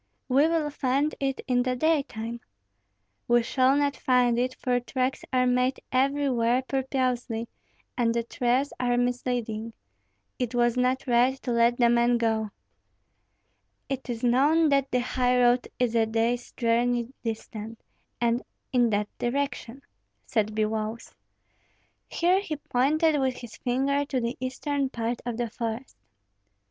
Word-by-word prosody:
"We 275 Hz, +4 st, +4 dB
will 320 Hz, -3 st, 0 dB
find 280 Hz, +2 st, 0 dB
it 270 Hz, -1 st, -1 dB
in 250 Hz, -1 st, +2 dB
the 255 Hz, 0 st, 0 dB
daytime." 245 Hz, -6 st, -1 dB, 0.9 s
"We 240 Hz, 0 st, +4 dB
shall 260 Hz, +3 st, +3 dB
not 285 Hz, 0 st, +1 dB
find 245 Hz, -2 st, +2 dB
it, 255 Hz, +1 st, -1 dB
for 250 Hz, -1 st, 0 dB
tracks 255 Hz, +2 st, -2 dB
are 255 Hz, -1 st, +3 dB
made 250 Hz, +1 st, +1 dB
everywhere 255 Hz, -2 st, +2 dB
purposely, 255 Hz, -4 st, -1 dB, 0.5 s
and 235 Hz, -2 st, +2 dB
the 235 Hz, 0 st, 0 dB
trails 250 Hz, +4 st, 0 dB
are 245 Hz, -1 st, +1 dB
misleading. 245 Hz, -2 st, -2 dB, 0.7 s
It 245 Hz, -1 st, -2 dB
was 240 Hz, 0 st, +2 dB
not 255 Hz, +1 st, +1 dB
right 250 Hz, +1 st, +3 dB
to 250 Hz, -, -2 dB
let 235 Hz, +1 st, +3 dB
the 240 Hz, -, +4 dB
man 240 Hz, 0 st, +3 dB
go." 220 Hz, -2 st, 0 dB, 1.4 s
"It 270 Hz, -2 st, -4 dB
is 235 Hz, -1 st, -4 dB
known 290 Hz, +7 st, +4 dB
that 275 Hz, -1 st, +2 dB
the 250 Hz, -, +1 dB
highroad 250 Hz, 0 st, +2 dB
is 245 Hz, -2 st, +1 dB
a 225 Hz, -1 st, +3 dB
day's 230 Hz, +2 st, -1 dB
journey 240 Hz, +1 st, 0 dB
distant, 225 Hz, -1 st, -6 dB, 0.4 s
and 235 Hz, +1 st, +1 dB, 0.3 s
in 245 Hz, -2 st, +4 dB
that 210 Hz, -1 st, 0 dB
direction," 270 Hz, 0 st, -3 dB, 0.4 s
said 215 Hz, -2 st, -1 dB
Biloüs. 220 Hz, +1 st, -2 dB, 0.9 s
Here 360 Hz, +3 st, +2 dB
he 320 Hz, -6 st, -4 dB
pointed 295 Hz, +3 st, +1 dB
with 260 Hz, -1 st, 0 dB
his 240 Hz, -2 st, -10 dB
finger 275 Hz, +3 st, 0 dB
to 275 Hz, -2 st, -1 dB
the 235 Hz, +1 st, -2 dB
eastern 270 Hz, +2 st, -2 dB
part 235 Hz, -1 st, -3 dB
of 235 Hz, -2 st, -3 dB
the 240 Hz, -2 st, -2 dB
forest. 230 Hz, +3 st, -5 dB
245 Hz, 140 wpm, -27 LUFS, 235-265 Hz, 1.4 s, We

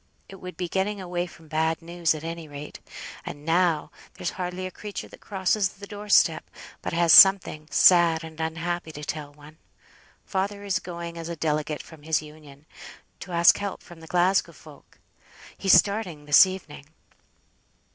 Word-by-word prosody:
It 195 Hz, -, -11 dB
would 180 Hz, -2 st, -10 dB
be 180 Hz, -, -3 dB
getting 195 Hz, +4 st, -2 dB
away 180 Hz, -1 st, -3 dB
from 165 Hz, -2 st, -17 dB
bad 160 Hz, +1 st, 0 dB
news 170 Hz, -1 st, -1 dB
at 155 Hz, -, -8 dB
any 165 Hz, -1 st, -6 dB
rate; 145 Hz, 0 st, -9 dB, 0.4 s
and 145 Hz, +1 st, -9 dB
now, 165 Hz, -2 st, +1 dB, 0.2 s
there's 175 Hz, -, -4 dB
hardly 180 Hz, 0 st, -5 dB
a 185 Hz, -, -6 dB
creature 210 Hz, +1 st, -8 dB
that -, -, -16 dB
crosses 195 Hz, 0 st, 0 dB
the 200 Hz, +1 st, -11 dB
door 205 Hz, +1 st, -9 dB
step, -, -, +3 dB, 0.3 s
but -, -, -4 dB
has 170 Hz, -1 st, +3 dB
something 185 Hz, -5 st, +7 dB
sad 170 Hz, -1 st, +5 dB
and 160 Hz, 0 st, -9 dB
unhappy 165 Hz, +1 st, -3 dB
to 150 Hz, -, -9 dB
tell 150 Hz, -1 st, -5 dB
one. 150 Hz, +2 st, -17 dB, 0.7 s
Father 200 Hz, +1 st, -3 dB
is 200 Hz, -3 st, -1 dB
going 170 Hz, -1 st, -7 dB
as 165 Hz, 0 st, -7 dB
a 170 Hz, -, -4 dB
delegate 150 Hz, -1 st, -2 dB
from 160 Hz, -2 st, -15 dB
his 155 Hz, +1 st, 0 dB
Union, 150 Hz, -2 st, -14 dB, 0.5 s
to 185 Hz, -, -9 dB
ask 170 Hz, 0 st, +5 dB
help 200 Hz, -1 st, -5 dB
from 175 Hz, -1 st, -14 dB
the 160 Hz, -, -13 dB
Glasgow 180 Hz, +3 st, +1 dB
folk. -, -, -17 dB, 0.6 s
He's 195 Hz, -, +2 dB
starting 200 Hz, -8 st, +2 dB
this 145 Hz, +6 st, +7 dB
evening." 185 Hz, -6 st, -9 dB
170 Hz, 170 wpm, -25 LUFS, 155-185 Hz, 0.7 s, something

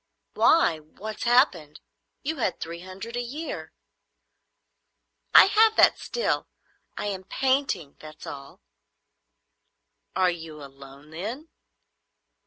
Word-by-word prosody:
"Why, 245 Hz, -, +4 dB
what's 200 Hz, +8 st, -8 dB
happened? 210 Hz, -, +3 dB, 0.4 s
You 315 Hz, +2 st, -2 dB
had 225 Hz, -7 st, -1 dB
three 170 Hz, +1 st, -6 dB
hundred 190 Hz, +6 st, -8 dB
a 245 Hz, -, -1 dB
year." 290 Hz, +7 st, -6 dB, 1.6 s
"I -, -, +11 dB
have 440 Hz, +2 st, +4 dB
that -, -, +5 dB
still. 480 Hz, -, -1 dB, 0.5 s
I -, -, -3 dB
am 195 Hz, -2 st, -3 dB
painting; 260 Hz, -, -1 dB
that's 155 Hz, 0 st, -12 dB
all." 140 Hz, -1 st, -9 dB, 1.5 s
"Are 185 Hz, -1 st, +3 dB
you 165 Hz, -2 st, -8 dB
alone, 140 Hz, +2 st, -14 dB
then?" 225 Hz, -, -6 dB
190 Hz, 105 wpm, -26 LUFS, 155-260 Hz, 1.6 s, I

